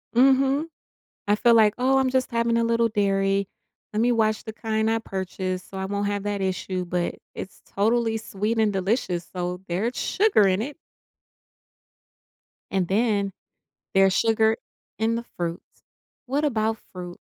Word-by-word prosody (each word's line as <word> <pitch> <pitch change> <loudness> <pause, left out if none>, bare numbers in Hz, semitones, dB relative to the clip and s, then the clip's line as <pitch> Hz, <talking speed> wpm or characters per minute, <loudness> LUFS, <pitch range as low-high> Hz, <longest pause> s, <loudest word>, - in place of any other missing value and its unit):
Mhm. 270 +4 +4 0.6
I 205 - +4
feel 235 +1 +5
like, 215 -2 +5
"Oh 265 +2 +3
I'm 260 -1 +2
just 260 0 +1
having 235 0 +1
a 230 - +2
little 230 0 +2
dairy. 195 -2 +1 0.4
Let 215 - 0
me 245 +1 +3
watch 220 -2 +1
the 220 - -6
kind 220 0 -1
I 225 - +2
purchase 185 -3 -4
so 195 - -11
I 190 - -2
won't 200 +1 -2
have 205 0 -2
that 205 -1 -2
issue," 185 -1 -2
but, 175 0 -1 0.2
it's 190 - -8
totally 225 +2 +1
sweet 220 +1 -2
and 215 -2 +3
delicious 190 -3 -1
so 180 0 -3
there's 215 +8 -1
sugar 385 - +3
in 185 +2 +1
it. 280 +5 -4 2.0
And 190 -3 +1
then, 200 -2 +1 0.6
there's 195 -1 +5
sugar 220 0 +3 0.4
in 225 +1 +1
the 235 - -3
fruits, 170 0 -2 0.6
what 285 +4 0
about 220 -4 0
fruit? 180 -1 -8
215 Hz, 155 wpm, -25 LUFS, 195-230 Hz, 2.0 s, feel